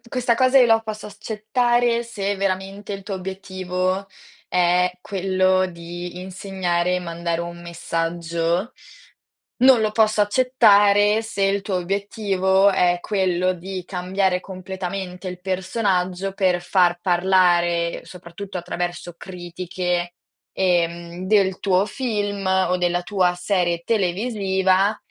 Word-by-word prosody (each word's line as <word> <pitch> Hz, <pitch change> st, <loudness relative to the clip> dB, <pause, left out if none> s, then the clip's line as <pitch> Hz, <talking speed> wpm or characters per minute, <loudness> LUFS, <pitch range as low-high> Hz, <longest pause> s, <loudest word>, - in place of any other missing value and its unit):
questa 245 Hz, -1 st, +1 dB
cosa 260 Hz, +2 st, +4 dB
io 250 Hz, -, +6 dB
la 225 Hz, -1 st, +4 dB
posso 215 Hz, -1 st, -6 dB
s 205 Hz, -, -13 dB
accettare 235 Hz, +3 st, 0 dB
se 205 Hz, -4 st, -3 dB
veramente 195 Hz, +1 st, -3 dB
il 195 Hz, 0 st, -6 dB
tuo 195 Hz, 0 st, -5 dB
obiettivo 185 Hz, 0 st, -3 dB, 0.4 s
è 180 Hz, 0 st, +2 dB
quello 185 Hz, -1 st, +1 dB
di 175 Hz, 0 st, -8 dB
insegnare 180 Hz, -1 st, -1 dB
e -, -, -2 dB
mandare 170 Hz, -1 st, -3 dB
un 170 Hz, 0 st, -7 dB
messaggio, 170 Hz, +2 st, -2 dB, 0.9 s
non 260 Hz, -3 st, +7 dB
lo 215 Hz, -1 st, 0 dB
posso 215 Hz, -1 st, +3 dB
accettare 210 Hz, -2 st, +4 dB
se 220 Hz, -3 st, -4 dB
il 195 Hz, 0 st, +1 dB
tuo 195 Hz, -2 st, -2 dB
obiettivo 195 Hz, +1 st, +1 dB
è 175 Hz, -2 st, +2 dB
quello 185 Hz, -2 st, 0 dB
di 185 Hz, +1 st, -6 dB
cambiare 185 Hz, 0 st, 0 dB
completamente 185 Hz, 0 st, -6 dB
il 180 Hz, 0 st, -7 dB
personaggio 190 Hz, 0 st, -1 dB
per 185 Hz, -3 st, +1 dB
far 175 Hz, -1 st, +2 dB
parlare, 175 Hz, -2 st, +2 dB
soprattutto 180 Hz, +2 st, -8 dB
attraverso 175 Hz, 0 st, -4 dB
critiche, 175 Hz, -1 st, -4 dB, 0.4 s
ehm, 170 Hz, -1 st, -1 dB
del 190 Hz, -2 st, +3 dB
tuo 195 Hz, 0 st, +2 dB
film 205 Hz, -7 st, -3 dB
o 190 Hz, -1 st, +2 dB
della 175 Hz, 0 st, 0 dB
tua 180 Hz, -2 st, +1 dB
serie 175 Hz, -2 st, 0 dB
televisiva 195 Hz, -1 st, +1 dB
185 Hz, 120 wpm, -22 LUFS, 175-200 Hz, 0.9 s, non